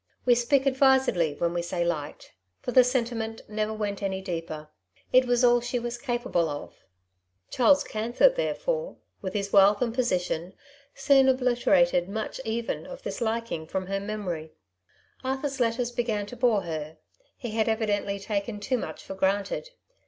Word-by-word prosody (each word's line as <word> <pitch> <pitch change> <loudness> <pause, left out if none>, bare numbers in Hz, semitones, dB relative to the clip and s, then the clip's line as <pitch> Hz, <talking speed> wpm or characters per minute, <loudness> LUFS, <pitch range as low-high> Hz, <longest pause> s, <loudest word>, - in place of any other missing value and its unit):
We 245 - +6
speak 250 +3 +2
advisedly 265 - +3
when 170 +2 -1
we 175 - -1
say 175 0 -2
likedy 155 -4 -4 0.3
for - - -4
the 255 +1 +7
sentiment 235 -3 -2
never 215 0 -2
went 210 -2 -3
any 190 -1 -1
deeper; 165 -4 -5 0.4
it 255 0 +6
was 245 0 +2
all 240 0 +5
she 245 +1 -2
was 240 0 -4
capable 240 - 0
of. 145 0 -6 0.8
Charles 280 +3 +4
Canthor, 235 - +3
therefore, - - -2 0.2
with 190 0 -5
his 200 -1 -2
wealth 200 +1 +6
and 235 -2 0
position 185 -7 -1 0.4
soon 270 -1 +5
obliterated 255 -5 +3
much 220 +5 -4
even 230 0 -3
of - - -9
this - - -5
liking 225 -8 -2
from 190 +2 -3
her 195 +1 -2
memory. 190 -6 -5 0.7
Arthur^s 270 +1 -2
letters 240 0 0
began 230 -4 -1
to 205 - -9
bore 235 -5 +2
her, 155 -2 -5 0.4
he 240 -4 -5
had 220 +1 +1
evidently 205 -3 0
taken 205 +1 -3
too 250 +4 -1
much - - -6
for - - -7
granted. 195 - -1
220 Hz, 160 wpm, -27 LUFS, 195-250 Hz, 0.8 s, the